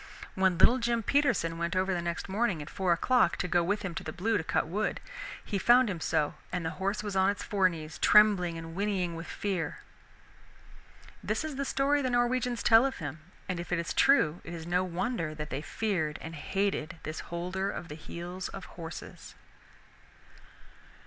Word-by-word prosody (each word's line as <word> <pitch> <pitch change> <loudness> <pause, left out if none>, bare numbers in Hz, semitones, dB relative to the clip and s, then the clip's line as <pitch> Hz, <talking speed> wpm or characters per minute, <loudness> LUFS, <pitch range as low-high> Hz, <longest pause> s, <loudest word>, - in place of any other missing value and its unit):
When 190 -2 +2
little 245 +8 +6
Jim 235 -1 0
Peterson 220 - +1
went 170 +2 -1
over 190 +1 +1
the 175 - -1
next 170 +2 -3
morning 195 -3 0
at 145 - -8
four 190 -3 0
o'clock 185 +2 +3
to - - -1
go 175 0 +3
with 205 +4 -1
him 185 -3 -3
to - - -5
the 155 - -5
Blue 220 +7 0
to 185 - 0
cut - - 0
wood, 200 +7 -1 0.5
he 200 - -2
found 240 +1 +5
him 175 - -4
so, 160 -2 0 0.2
and 180 -2 -2
the 160 - -1
horse 200 +2 0
was 205 -2 -4
on 190 0 +4
its 200 - -2
fore 195 -3 +3
knees, 160 -2 -8
trembling 195 -5 +5
and 165 0 -7
whinnying 185 -3 -1
with 165 +1 -7
fear. 190 -5 -3 1.4
This - - -1
is 310 -3 -4
the 275 +1 -2
story 280 +2 +2
the 260 - 0
Norwegians 245 0 +1
tell 225 +1 +7
of 270 0 -1
him, 155 0 -5 0.3
and 185 -2 -2
if 175 - -6
it 175 - +2
is 170 - -2
true 180 - +4
it 170 - -7
is 160 -1 -7
no 180 +2 +1
wonder 180 -3 -2
that 150 -1 -6
they 135 - -2
feared 160 -4 -1
and 160 - -7
hated 170 0 -2
this 155 +1 -5
Holder 180 +3 -2
of 175 - -5
the 150 - -7
Heels 175 +4 -6
of 195 - -8
Horses. 165 -2 -9
185 Hz, 195 wpm, -30 LUFS, 165-215 Hz, 1.4 s, tell